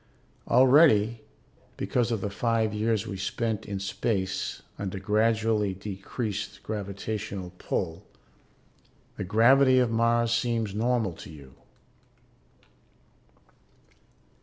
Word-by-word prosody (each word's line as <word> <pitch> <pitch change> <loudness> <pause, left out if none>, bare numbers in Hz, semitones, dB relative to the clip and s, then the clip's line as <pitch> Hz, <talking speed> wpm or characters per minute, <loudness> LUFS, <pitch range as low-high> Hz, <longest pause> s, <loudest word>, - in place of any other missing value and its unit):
Already, 120 -4 +5 0.6
because 120 -1 0
of 110 -3 -1
the 100 - -3
five 115 0 0
years 110 -1 0
we 95 - -5
spent 110 +2 -2
in 100 -1 -3
space 95 -1 -2 0.2
under 100 -1 -4
gradually 110 0 +1
decreased 100 +2 -5
gravitational 100 -2 -5
pull, 85 +1 -3 1.1
the - - -3
gravity 130 +7 +5
of 125 -2 +3
Mars 115 0 +2
seems 115 -3 0
normal 115 -3 0
to - - -11
you. 70 -5 -13
110 Hz, 95 wpm, -27 LUFS, 100-115 Hz, 1.1 s, Already